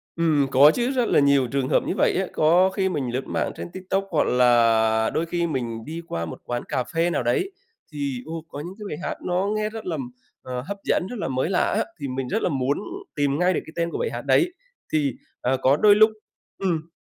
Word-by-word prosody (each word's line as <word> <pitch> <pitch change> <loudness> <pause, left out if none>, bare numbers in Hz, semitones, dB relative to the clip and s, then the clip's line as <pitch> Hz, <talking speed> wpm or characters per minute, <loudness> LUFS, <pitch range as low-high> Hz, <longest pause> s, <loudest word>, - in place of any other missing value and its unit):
Ừm, 155 -4 +2
có 140 +4 +7
chứ, 245 +2 0
rất 250 -4 +1
là - - +4
nhiều 140 -2 +4
trường 135 +1 -1
hợp - - +3
như - - 0
vậy - - +3
á. 190 - 0
Có 175 +5 +4
khi 190 0 0
mình 140 -8 -2
lướt 130 +2 -3
mạng - - -1
trên - - -7
TikTok, 190 +1 -2
hoặc 160 - +2
là 115 -3 +4
đôi 165 - 0
khi 170 0 -1
mình 120 -6 -3
đi 165 +2 -6
qua 85 0 -3
một 80 - -8
quán 120 0 -3
cà 125 - -2
phê 165 +5 0
nào 130 - -1
đấy, 245 - 0 0.4
thì, 140 -4 -3
ô, 160 0 -6
có 145 - -8
những 175 +5 -6
cái 210 - -7
bài 150 - -4
hát - - -3
nó 180 +3 0
nghe 215 0 -1
rất 220 0 -8
là, 170 -3 -2 0.5
ờ, 125 -1 -5
hấp 200 +10 -6
dẫn, 180 - +1
rất 245 - -6
là - - -2
mới 130 +4 -1
lạ 185 - +1
á, 220 - +2 0.2
thì 140 - -4
mình 130 0 -3
rất 220 - -1
là - - +1
muốn 140 -1 0 0.4
tìm 145 0 +1
ngay 180 +1 +3
được - - 0
cái 160 - -12
tên 170 0 0
của - - -3
bài 475 - -1
hát - - -4
đấy. 350 0 +3 0.4
Thì, 145 -4 +1 0.3
à, 130 +1 +1
có 135 +2 +4
đôi 205 +2 +6
lúc 215 +1 +7 0.5
ừm. 165 -4 -1
155 Hz, 245 wpm, -24 LUFS, 130-185 Hz, 0.5 s, có